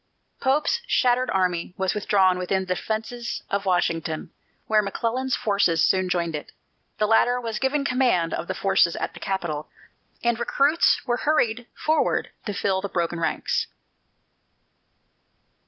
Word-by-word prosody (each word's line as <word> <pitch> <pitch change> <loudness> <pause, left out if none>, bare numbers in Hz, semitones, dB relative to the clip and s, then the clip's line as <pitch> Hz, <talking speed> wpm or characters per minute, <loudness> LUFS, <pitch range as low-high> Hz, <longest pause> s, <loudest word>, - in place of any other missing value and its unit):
Pope's 295 - +1
shattered 250 0 +2
army 180 -1 0
was 190 -1 0
withdrawn 190 -3 +2
within 190 +1 0
the 185 - 0
defences 225 +4 -4
of 200 0 -1
Washington, 165 -3 0 0.3
where 215 -1 +3
McClellan's 235 +6 -1
forces 200 -6 +2
soon 185 -1 +2
joined 170 -3 -1
it. 150 - -7 0.5
The 215 - +2
latter 240 +3 +3
was 225 -3 -4
given 280 +1 0
command 250 -11 +2
of - - -3
the - - -3
forces 170 -3 +2
at - - -3
the - - -11
capital, 170 -6 -3 0.5
and 235 -1 +1
recruits 285 +7 +2
were 240 0 0
hurried 245 -6 +1
forward 315 0 0 0.2
to 205 - -2
fill 190 -1 0
the 200 - -4
broken 170 -1 -1
ranks. 165 - -1
205 Hz, 140 wpm, -24 LUFS, 180-245 Hz, 0.5 s, where